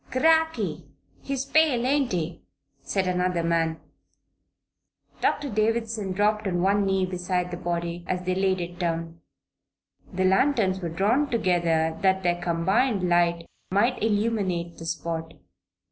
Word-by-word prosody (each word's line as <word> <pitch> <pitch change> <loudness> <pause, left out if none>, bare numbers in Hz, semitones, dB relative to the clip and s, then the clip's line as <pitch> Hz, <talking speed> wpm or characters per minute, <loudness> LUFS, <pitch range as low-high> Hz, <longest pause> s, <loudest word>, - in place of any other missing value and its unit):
"Cracky! 320 +4 +1 0.3
He's 275 -1 -3
pale; 275 -5 +3
ain't 275 -1 +1
he?" 170 -2 -3 0.4
said 195 -2 -1
another 180 -1 0
man. 165 -1 0 1.4
Doctor 290 - +1
Davison 220 -2 -1
dropped 210 +2 +1
on 175 -2 0
one 200 +1 +2
knee 190 -1 +1
beside 180 0 -2
the 175 - -4
body 170 0 -3
as 180 0 -2
they 185 0 0
laid 190 0 +1
it 175 +1 -6
down. 165 -1 -3 0.9
The 185 -1 0
lanterns 190 -1 +2
were 175 -3 -4
drawn 220 - +1
together 170 -7 +1
that 190 0 +2
their 175 0 0
combined 190 +5 +1
light 170 -1 +2 0.2
might 235 +7 +1
illuminate 205 -6 -1
the 165 - -7
spot. 165 -1 -4
185 Hz, 130 wpm, -25 LUFS, 170-215 Hz, 1.4 s, pale